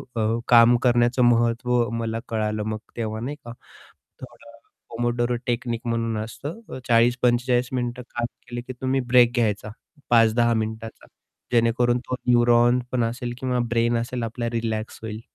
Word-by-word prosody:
अ, 115 +1 0
काम 120 0 +7
करण्याचं 120 0 +3
महत्व 120 0 +2
मला 115 0 -2
कळालं 110 -1 -1
मग 110 0 -3 0.2
तेव्हा, 110 -1 -3
नाही 135 +6 -4
का? 120 - -7 0.7
थोडं 115 0 -13 0.3
पोमोडोरो 120 +1 -1
टेक्निक 120 -1 -2
म्हणून 115 -1 -1
असतं 145 - -8
अ, - - -6
40-45 120 +1 +2
मिनिटं 125 0 -3
काम 120 0 0 0.2
केलं 120 0 -5
की - - -4
तुम्ही 130 +1 0
ब्रेक 120 -1 +6
घ्यायचा, 105 -3 0 0.4
5-10 115 0 +4
मिनिटाचा, 110 0 -5 0.5
जेणेकरून 120 +1 +2
तो - - -1
न्यूरॉन 120 0 +4
पण 120 -2 +1
असेल 120 +1 -4
किंवा 125 -1 -1
ब्रेन 120 0 +2
असेल 120 +1 -4
आपला 115 +1 -3
रिलॅक्स 110 -1 -3
होईल. 110 0 -6
120 Hz, 145 wpm, -23 LUFS, 115-120 Hz, 0.7 s, काम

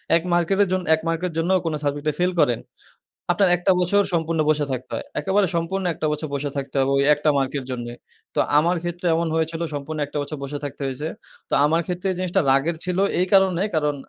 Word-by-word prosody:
১ 165 - +2
মার্কেটের 195 +4 +2
জন 185 0 +1
১ 160 - -8
মার্কের 165 +2 -1
জন্যও 180 +3 +2
কোনো 160 -2 -1
সাবজেক্ট 145 +1 -2
ফাইল 180 +1 +2
করেন, 125 -6 +2 0.7
আপনার 190 +1 +3
একটা 175 +2 +2
বছর 200 +3 +3
সম্পূর্ণ 165 -1 0
বসে 150 -1 +2
থাকতে 125 0 -5
হয়। - - -5
একেবারে 195 0 +2
সম্পূর্ণ 170 +3 -1
১ - - -7
টা 155 - +1
বছর 150 +1 -4
বসে 145 +1 -2
থাকতে 135 0 -5
হবে 135 0 +2
ওই 140 - +3
একটা 150 +1 +1
মার্ক 135 -1 0
এর 130 - -9
জন্যে। 120 -1 -5 0.4
তো - - +1 0.2
আমার 170 +3 +1
ক্ষেত্রে 175 +1 -3
এমন 170 +1 0
হয়েছিল 160 +1 -1
সম্পূর্ণ 145 +2 -4
একটা 145 +1 -6
বছর 145 +2 -5
বসে 140 +1 -4
থাকতে 145 - -7
হইছে। 135 +4 -4 0.4
তো - - -4
আমার 165 +3 +2
ক্ষেত্রে 180 +1 -3
এই - - -3
জিনিসটা 185 -1 +1
রাগের 140 +5 +2
ছিল 180 0 -2 0.2
এই 180 - +2
কারণে 190 -1 +4
কারণ 150 -2 +1
165 Hz, 215 wpm, -23 LUFS, 145-180 Hz, 0.7 s, কারণে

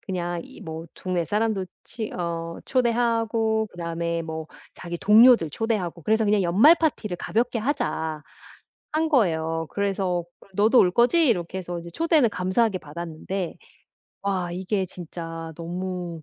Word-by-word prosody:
그냥 175 -2 -3
이 - - -14
뭐 160 +1 -7
동네 180 -2 -2
사람도 210 0 0 0.2
치 220 -3 -5
어 170 -1 -4
초대하고 230 -3 +1
그다음에 170 -1 -3
뭐 160 -1 -5 0.3
자기 175 0 -6
동료들 215 -4 +6
초대하고 185 -4 -2
그래서 220 +3 +2
그냥 205 -1 +3
"연말 205 - +6
파티를 260 - -1
가볍게 230 +7 0
하자." 160 - -2 0.7
한 315 +1 +1
거예요. 165 - +1
그래서 190 -3 -1 0.2
"그럼 - - -20
너도 220 +5 +5
올 180 - +6
거지?" 250 - +4
이렇게 180 -3 0
해서 175 -1 -5
이제 170 0 -8
초대는 315 - +3
감사하게 190 +3 +1
받았는데 170 +3 -5 0.7
와 190 -3 -1
이게 190 +2 -1
진짜 165 -2 -7
너무 175 -1 -5
185 Hz, 305 characters per minute, -25 LUFS, 170-225 Hz, 0.7 s, 동료들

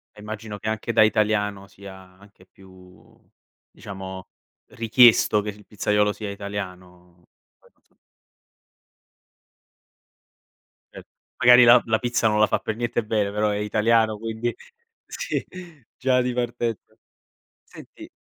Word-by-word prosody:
Eh, 105 - -16
immagino 105 0 -8
che - - -7
anche 110 +2 -3
da 110 - +5
italiano 105 -2 0
sia 100 -1 -13 0.2
anche 100 -2 -20
più 95 -1 -19 0.6
diciamo 95 -1 -9 0.4
richiesto 115 -2 +4
che 105 - -6
il 105 0 -11
pizzaiolo 105 0 0
sia 105 0 -7
italiano, 90 -3 -9 0.3
poi - - -26
non - - -41
so. - - -38 3.0
Cer - - -11 0.4
magari 125 +1 +8
la 120 +1 +7
la 110 -1 +1
pizza 120 -2 0
non 105 0 +1
la 105 - +4
fa - - 0
per 110 - -4
niente 120 0 -2
bene, 105 -2 -1
però 105 +1 0
è 105 - -2
italiano 110 +1 +1
quindi. 115 +2 -4 0.5
Sì, - - -4 0.5
già 130 -1 +1
di 125 0 -2
partenza. 120 -3 -4 0.7
Senti - - -14
105 Hz, 130 wpm, -23 LUFS, 100-115 Hz, 3.0 s, magari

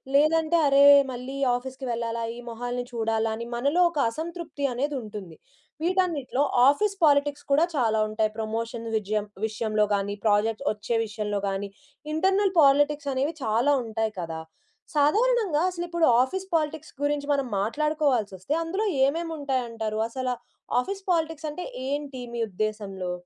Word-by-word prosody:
లేదంటే, 315 +3 +4
అరే! 275 +1 +6 0.3
మళ్ళీ 255 +3 -6 0.2
ఆఫీస్‌కి 260 +1 -6
వెళ్ళాలా, 230 0 -3
ఈ - - -8
మొహాల్ని 245 +1 -4
చూడాలా 225 -1 0
అని 235 +1 -6
మనలో 285 +9 +2
ఒక - - -7
అసంతృప్తి 330 +1 -6
అనేది 285 +4 -1
ఉంటుంది. 205 -6 -9 0.5
వీటన్నిటిలో 340 -7 0 0.3
ఆఫీస్ 395 +8 +1
పాలిటిక్స్ 290 -1 +3
కూడా 295 +4 +5
చాలా 225 -6 +1
ఉంటాయి. 215 0 0
ప్రమోషన్ 230 +1 -3
విజయం 210 0 -1 0.2
విషయంలో 215 -1 0
గాని, 200 0 0
ప్రాజెక్ట్ 215 +4 +2
వచ్చే 210 +2 -3
విషయంలో 210 -1 -3
గాని, 195 +1 -2 0.5
ఇంటర్నల్ 385 +4 +2
పాలిటిక్స్ 290 0 +4
అనేవి 275 +5 0
చాలా 230 +5 +2
ఉంటాయి 220 0 -2
కదా! 165 -2 -4 0.5
సాధారణంగా 400 +2 +3
అసలిప్పుడు 345 -2 -1 0.2
ఆఫీస్ 380 +8 -4
పాలిటిక్స్ 315 -1 -2
గురించి 290 0 -1
మనం 275 -2 0
మాట్లాడుకోవాల్సి 275 -3 0
వస్తే, 190 +11 -3
అందులో 385 +6 -1 0.2
ఏమేమి 330 +4 -1
ఉంటాయంటారు? 230 -6 -2
అసలు 255 +1 -2 0.5
ఆఫీస్ 390 +7 -6
పాలిటిక్స్ 320 -2 -1
అంటే 355 +4 -6 0.2
ఏంటి 280 -2 -3
మీ 235 - -2
ఉద్దేశంలో? 195 -2 -3
265 Hz, 135 wpm, -26 LUFS, 220-310 Hz, 0.5 s, అరే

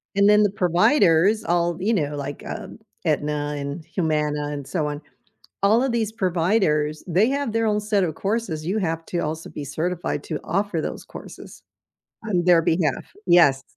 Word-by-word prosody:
And 200 +1 +5
then 210 0 +6
the 205 - +3
providers, 180 - +3
all, 170 -1 0
you 220 +4 +1
know, 150 -6 -1
like, 145 0 -6
um, - - -7 0.3
Aetna 150 -1 -1
and 145 +3 -5
Humana 150 -4 -1
and 145 -2 -6
so 155 -5 -1
on, 145 +1 -5 0.6
all 220 +5 +4
of 265 - 0
these 225 -2 -1
providers, 170 -6 +1
they 190 +8 +3
have 280 -4 -1
their 225 0 0
own 210 -1 +1
set 210 -2 +1
of 160 -3 -1
courses, 195 -7 -2
you 195 +5 -1
have 165 -4 -2
to 175 - -2
also 160 0 -4
be 145 - -7
certified 170 +5 -3
to 155 - -4
offer 190 -1 -1
those - - -5
courses - - -12 0.6
on 180 -5 0
their 175 -2 +5
behalf 160 -5 0
Yes. 145 -7 +5
170 Hz, 175 wpm, -23 LUFS, 150-205 Hz, 0.6 s, then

